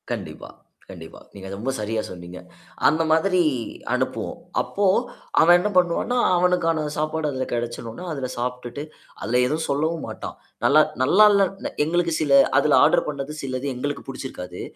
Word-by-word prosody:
கண்டிப்பா, - - -6 0.4
கண்டிப்பா. - - -11
நீங்க 95 -1 -10
ரொம்ப 115 +7 -3
சரியா 110 +1 -2
சொன்னீங்க. 90 0 -9 0.5
அந்த 160 +3 +3
மாதிரி 180 +3 +3 0.5
அனுப்புவோம். - - -2 0.2
அப்போ 200 - -2 0.6
அவன் 175 +2 +7
என்ன 210 - -1
பண்ணுவான்னா, 180 +8 +1 0.2
அவனுக்கான 165 -3 +1
சாப்பாடு 155 0 -1
அதில 130 -1 -3
கிடைச்சடுனா, 120 +4 -5
அதில 135 -3 -3
சாப்பிட்டு 125 +2 -4 0.4
அதல 125 +2 +1
எதுவும் 155 +4 -2
சொல்லவும் 155 +3 -1
மாட்டான். - - -7 0.3
நல்லா 155 +2 +6 0.2
நல்லா 195 +11 +6
இல்ல 195 -1 0
எங்களுக்கு 170 +1 0
சில 140 -2 +5 0.2
அதுல - - +4
ஆர்டர் - - +3
பண்ணது 145 0 -5
சிலது 130 +1 -3
எங்களுக்கு 145 +3 -4
புடிச்சிருக்காது. 90 -10 -7
145 Hz, 140 wpm, -23 LUFS, 125-165 Hz, 0.6 s, அவன்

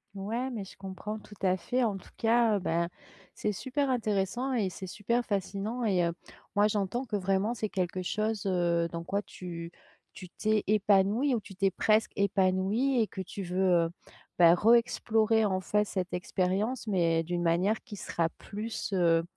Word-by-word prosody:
Ouais, 225 +7 -2
mais 230 -6 -4
je - - -13
comprends 195 +3 -6
tout 210 - -14
à 185 -1 +3
fait. 250 +7 -1
En 210 -4 0
tout 190 - -14
cas, 230 -1 +3
heu, - - -2
ben, 170 -2 0 0.5
c'est 210 - -1
super 265 +7 -2
intéressant 225 +1 0
et 215 -6 +1
c'est 190 +1 -8
super 235 +6 -1
fascinant 205 +4 -2
et 190 -5 +2
heu, 170 - -1 0.4
moi 205 +1 +5
j'entends 210 +4 -1
que 215 - -3
vraiment 195 +3 +1
c'est 215 -3 -3
quelque 185 -1 -2
chose, 215 +3 -2
heu, 170 -2 +1
dans 170 0 -4
quoi 200 +4 -1
tu 170 -4 -8 0.4
tu 185 -2 -10
t'es 215 +2 0
épanouie 210 +5 +3
ou - - 0
tu 195 - -12
t'es 195 +1 +2
presque 215 +3 +2
épanouie 200 +6 +2
et - - +3
que 190 - -6
tu 195 +2 -6
veux, 180 +1 -3 0.3
heu, - - -3 0.5
bah, 170 -1 +8
re 220 +6 +5
explorer, 225 -2 +3
en 190 -2 +1
fait, 210 +3 +1
cette 185 -3 -3
expérience 195 +5 -1
mais 170 -5 +2
d'une 175 +1 -2
manière 180 +6 +1
qui 225 -6 -9
sera 170 -3 -1
plus, 215 +1 -5
heu, 165 -3 +3
200 Hz, 185 wpm, -29 LUFS, 185-220 Hz, 0.5 s, bah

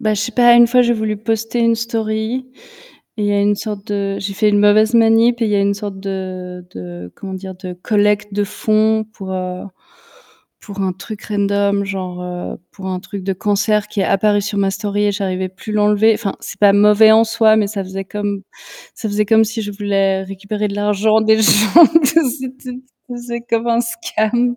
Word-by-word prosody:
ben, 215 -1 0
je 200 - -2
sais 225 +3 -3
pas, 240 0 +5
une 240 0 +7
fois, 250 +1 +4
j'ai 240 0 +2
voulu 215 -2 -2
poster 225 +2 -2
une 230 0 +3
story, 225 +2 -3 0.7
et 210 - -1
il - - 0
y - - +1
a 200 - +1
une 205 +1 +2
sorte 210 -1 -6
de 200 -1 -2
j'ai 195 0 -5
fait 210 +2 +2
une 205 - +2
mauvaise 215 +2 +4
manip 230 +1 +4
et - - +2
il - - -1
y 205 - +1
a - - +2
une 200 0 +1
sorte 200 -1 -7
de 185 -2 -6
de, 90 -1 -9
comment 195 - -8
dire? 190 0 -8
De 185 -1 -8
collecte 210 +2 0
de 205 0 0
fonds 215 +1 +1
pour, 190 -2 -7
heu, 185 -1 -4 1.0
pour 200 -2 -9
un 185 -1 -1
truc 215 +3 -9
random 200 -1 0
genre, 185 -2 -5
heu, 180 0 -6
pour 190 - -10
un 185 -1 -3
truc 200 0 -8
de 195 - -1
cancer 210 +1 0
qui 205 - -3
est - - +1
apparu 205 +1 +2
sur 205 0 -3
ma 195 -1 +1
story 205 +1 -2
et 205 - +1
j'arrivais 190 -2 -3
plus 200 +3 -9
l'enlever. 210 +1 +3
Enfin, 210 -3 -3
c'est - - -9
pas 205 -1 +6
mauvais 210 +2 +6
en 225 +1 +5
soi, 220 -1 +3
mais 210 -2 +1
ça 200 -1 -4
faisait 195 +1 -6
comme 205 0 -4 0.5
ça 220 - -5
faisait 210 +1 0
comme 220 0 +4
si 225 +1 -4
je 205 - -5
voulais 195 -1 0
récupérer 200 +2 -4
de 200 - -5
l'argent 210 +1 +2
des 220 0 +3
gens, 215 - +6 0.2
tu - - +3
sait, 330 +1 +4
que 270 - 0
c'était 255 -1 -8 0.4
c'était 240 -1 -6
comme 230 +1 0
un 235 0 +2
scam. 235 +1 -1
210 Hz, 215 wpm, -17 LUFS, 195-220 Hz, 1.0 s, une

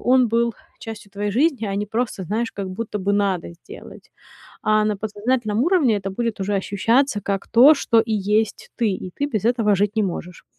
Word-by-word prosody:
он 250 -1 +3
был 235 +1 +1 0.3
частью 220 -2 -9
твоей 205 +1 -2
жизни, 260 +1 +1
а 195 - -3
не 205 +1 -2
просто, 220 -2 -3
знаешь, 225 +5 -2
как 195 -1 -5
будто 210 +2 -4
бы 200 +1 -1
надо 200 -4 0
сделать. 395 - -13 0.5
А 215 0 +2
на 210 -1 0
подсознательном 215 +2 -1
уровне 305 - +3
это 195 -1 -4
будет 230 +1 -3
уже 200 +1 -1
ощущаться 215 +5 +1
как 195 0 -3
то, 255 +7 +7
что 230 -4 +2
и 225 0 0
есть 210 +1 -1
ты, 230 -3 +2
и 185 -1 -5
ты 285 - -1
без 215 -7 -2
этого 225 -4 +2
жить 205 +2 0
не 215 - +2
можешь. 180 -2 -6
215 Hz, 200 wpm, -22 LUFS, 200-235 Hz, 0.5 s, то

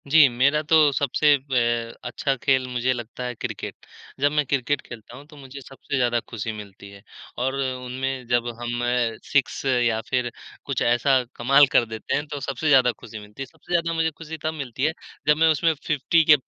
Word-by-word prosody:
जी। 150 0 +7
मेरा 140 +5 +2
तो 155 -1 +5
सबसे 145 +2 +3
बे 130 -2 +2 0.5
अच्छा 135 -1 -1
खेल 130 -2 +2
मुझे 125 0 0
लगता 120 +1 -7
है 125 -1 -4
क्रिकेट। - - -5 0.4
जब 145 +1 +3
मैं 150 -1 +1
क्रिकेट 140 +1 0
खेलता 120 +1 -11
हूँ 140 - -13
तो 150 -1 -16
मुझे 140 0 -10
सबसे 135 +2 -7
ज़्यादा 120 -2 +2
खुशी 115 0 -4
मिलती 100 -2 -10
है। 100 0 -14 0.4
और 130 +2 -1
उनमें 130 0 -3
जब 120 0 +1
हम 120 0 -3 0.4
6 140 -3 0
या 120 -4 +2
फिर 125 -2 0 0.3
कुछ - - -2
ऐसा 125 +2 +3
कमाल 140 +4 +5
कर 120 - +4
देते 110 -1 -4
हैं, 145 - -1
तो 145 -1 -5
सबसे 135 +3 -3
ज़्यादा 130 -4 +5
खुशी 110 0 -10
मिलती 105 +4 -12
है। - - -2
सबसे 135 +6 -18
ज़्यादा 170 -1 +1
मुझे 165 0 +1
खुशी 160 +1 -9
तब 155 - -1
मिलती 135 -4 -5
है 160 - +1 0.3
जब 150 0 +5
मैं 160 +1 +4
उसमें 160 +1 +2
50 155 +3 +3
के - - +10
130 Hz, 195 wpm, -24 LUFS, 120-145 Hz, 0.5 s, के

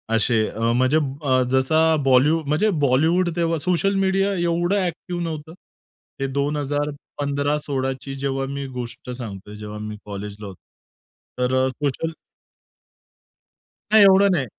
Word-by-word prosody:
असे. 110 -1 +2
अ, - - -9 0.2
म्हणजे 130 +4 +3
अ, 140 -3 0
जसा 155 +5 +3
बॉलीवू 135 +5 +4
म्हणजे 155 +9 +2 0.2
बॉलिवूड 160 +7 +3
तेव्हा 165 -1 +1
सोशल 180 +5 +1
मीडिया 195 +1 +1
एवढं 175 +1 +1
अ‍ॅक्टिव्ह 180 -1 -3
नव्हतं. 160 -1 -5 0.7
हे 135 - 0
2015-16ची 145 -1 -2
जेव्हा 135 0 -2
मी 140 0 -4
गोष्ट 120 +1 -7
सांगतोय, 105 -5 -8
जेव्हा 105 0 -7
मी 105 0 -6
कॉलेजला 105 0 -7
होतो. 95 -2 -11 0.8
तर 125 +1 +1
अ, - - +2
सोशल 145 +4 -2 1.8
नाही, 215 -1 +8
एवढं 195 0 +6
नाही. 135 - 0
140 Hz, 125 wpm, -22 LUFS, 130-165 Hz, 1.8 s, नाही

